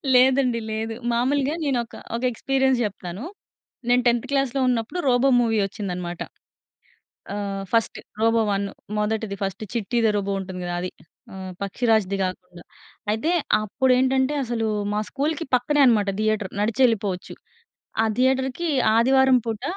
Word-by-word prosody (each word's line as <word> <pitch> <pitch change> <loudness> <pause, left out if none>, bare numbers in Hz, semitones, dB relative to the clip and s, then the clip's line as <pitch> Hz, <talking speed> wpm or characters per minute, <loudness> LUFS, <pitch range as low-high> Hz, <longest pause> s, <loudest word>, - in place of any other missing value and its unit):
లేదండి 255 -1 +4
లేదు. 220 +1 -3 0.2
మామూలుగా 275 +5 +1
నేను 275 -4 +1
ఒక - - -15 0.2
ఒక 235 - -4
ఎక్స్పీరియన్స్ 265 +2 +1
చెప్తాను. 190 0 -6 0.7
నేను 245 0 +4
10థ్ 235 -1 +2
క్లాస్‌లో 275 -1 +1
ఉన్నప్పుడు 245 +8 -1
'రోబో' 255 +2 +4
మూవీ 225 -2 +1
వచ్చిందన్నమాట. 180 -4 -5 1.1
ఆ! - - -3 0.4
ఫస్ట్ 230 -1 +1 0.2
'రోబో 225 +1 +3
1' 200 0 -1 0.3
మొదటిది 210 -1 -1
ఫస్ట్ 195 +3 -3
'చిట్టి 235 0 -1
ది 220 - +5
రోబో' 200 -1 -1
ఉంటుంది 185 -1 -6
కదా! 175 - -3
అది. 180 +1 -3 0.4
ఆహ్, 190 -1 -7
'పక్షిరాజ్‌' 220 0 +1
ది - - +1
కాకుండా. 180 -1 -6 0.5
అయితే 225 +10 0 0.3
అప్పుడేంటంటే, 260 +4 +2
అసలు 235 -2 -2 0.3
మా 210 - 0
స్కూల్‌కి 305 +4 -1
పక్కనే 270 +4 +2
అనమాట 215 -5 +3
థియేటర్ 215 -3 0
నడిచెళ్ళిపోవచ్చు. 210 -4 +1 0.7
ఆ - - +3
థియేటర్‌కి 265 +5 +1 0.3
ఆదివారం 265 +2 +5
పూట 225 0 -3
230 Hz, 135 wpm, -23 LUFS, 205-260 Hz, 1.1 s, ది